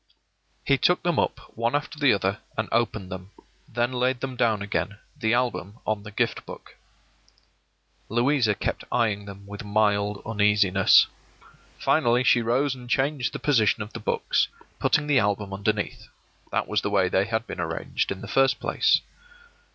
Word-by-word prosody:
He 140 -1 +3
took 180 - +2
them 175 -3 +1
up - - 0 0.2
one 115 +3 0
after 150 0 -3
the 145 -3 +5
other 100 0 0 0.2
and 110 0 -1
opened 110 -5 0
them; 95 +1 -7 0.4
then 120 +2 0
laid 125 0 0
them 130 0 -4
down 110 -4 +1
again, 100 0 -2 0.2
the 110 +1 +1
album 120 -4 -2
on 110 -1 -1
the 105 - -9
Gift 105 - -1
Book. - - -11 1.3
Louisa 120 -1 +2
kept - - -3
eying 105 -4 +1
them 100 0 -10
with 105 +3 -8
mild 105 -1 +1
uneasiness. 105 -3 +4 0.7
Finally 120 +1 +2
she 120 -1 +4
rose 130 +5 +1
and 125 -2 -11
changed 135 0 0
the - - -5
position 110 -6 +2
of 105 - -12
the - - -5
books, - - 0 0.3
putting 150 - +2
the 145 -3 +3
album 100 -1 -1
underneath. 100 +1 -2 0.4
That - - 0
was 105 -1 0
the - - -2
way 100 -3 +2
they 95 +2 +2
had 110 +1 -2
been 95 - -7
arranged 80 -1 -2
in 95 - -5
the - - -7
first 135 -2 +2
place. - - +2
110 Hz, 165 wpm, -25 LUFS, 100-125 Hz, 1.3 s, the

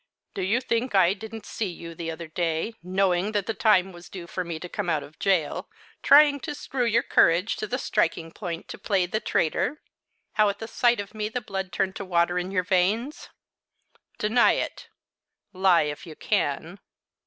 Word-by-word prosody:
"Do - - -4
you 210 +7 +1
think 235 -1 -1
I 185 -1 +5
didn't 220 +1 -9
see 220 - -3
you 170 -1 -8
the 165 0 -5
other 165 +1 -6
day, 165 +5 -1
knowing 185 +2 +1
that 205 -2 0
the 225 - -2
time 195 -5 +3
was 175 -1 -13
due 180 -3 -8
for 185 +2 -4
me 170 -2 -5
to 180 - -7
come 190 0 -3
out 155 -3 +1
of 150 - -15
gaol, 185 -7 0 0.3
trying 290 -1 +6
to 295 +1 -5
screw 260 -3 -2
your 230 0 +2
courage 170 +6 +3
to 215 - -3
the 250 - -1
striking 165 -8 0
point 170 -3 -6
to - - -8
play 195 -4 +1
the 200 +5 -2
traitor; 225 - 0 0.5
how 215 -2 +4
at 200 - -3
the 225 - -6
sight 240 0 +2
of 200 +1 -6
me 215 -1 -3
the 250 - -2
blood 190 -4 -5
turned 190 +2 -1
to - - -5
water 175 0 +2
in 180 +1 -4
your 185 -2 0
veins? 205 +9 0 0.9
Deny 220 +3 +4
it - - -4 0.7
lie 185 -3 +4
if 150 +2 -5
you 160 - -9
can." 175 -1 -1
190 Hz, 195 wpm, -26 LUFS, 170-220 Hz, 0.9 s, trying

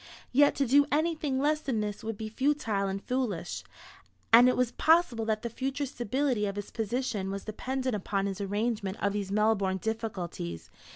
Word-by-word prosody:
Yet 285 +3 +5
to 280 - +1
do 285 +3 +5
anything 310 -2 0
less 300 +2 +2
than 260 -7 -1
this 210 0 -3
would 225 -1 -4
be 220 - -4
futile 225 -5 0
and 195 +1 -3
foolish; 230 -10 -2 0.7
and 245 +2 +9
it - - +1
was 250 -2 +2
possible 320 -9 +3
that 220 0 -1
the - - -1
future 270 +4 -2
stability 250 -3 -1
of 200 - -4
his 205 -1 -6
position 225 -3 -2
was 195 0 -5
dependent 255 +3 -2
upon 200 0 -1
his 200 0 -3
arrangement 205 0 -1
of 200 0 0
these 200 -2 -3
Melbourne 205 -2 +2
difficulties. 190 - -4
225 Hz, 175 wpm, -29 LUFS, 200-265 Hz, 0.7 s, and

